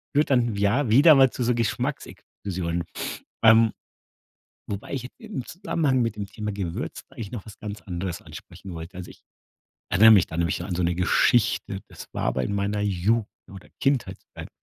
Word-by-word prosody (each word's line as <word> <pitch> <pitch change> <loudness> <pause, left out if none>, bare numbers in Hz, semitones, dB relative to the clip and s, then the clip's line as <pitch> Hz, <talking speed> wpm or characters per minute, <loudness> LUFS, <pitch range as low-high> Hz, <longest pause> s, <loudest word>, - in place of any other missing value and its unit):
führt 150 +2 +3
dann, 120 -5 +2
ja, 105 +6 +1
wieder 145 +8 +8
mal 135 -1 +6
zu 125 - -3
so 120 +1 +2
Geschmacksexplosion. 90 -6 -3 0.6
Ähm, 115 0 +7 1.0
wobei 100 0 -5
ich 125 -2 -4
im 215 - -6
Zusammenhang 150 - 0
mit 115 -2 -1
dem 100 -1 -4
Thema 105 +1 -5
Gewürz 100 +2 -4
eigentlich 120 -7 -8
noch 115 -5 -6
was 105 - -12
ganz 105 -1 -7
anderes 90 -1 -5
ansprechen 95 - -11
wollte. 85 +3 -8
Also 90 -1 -8
ich - - -16 0.7
erinnere 110 +4 +7
mich 100 -5 +6
da 80 - -7
nämlich 85 -1 0
so - - -6
an 95 - -4
so 90 - -1
'ne 85 0 +1
Geschichte. 95 +2 +2
Das - - -11
war - - -3
aber 65 - 0
in 100 - -2
meiner 100 +1 -1
Jugend 105 +3 +1 0.2
oder 100 0 -12
Kindheitszeit. 135 -2 -2
105 Hz, 175 wpm, -25 LUFS, 95-120 Hz, 1.0 s, wieder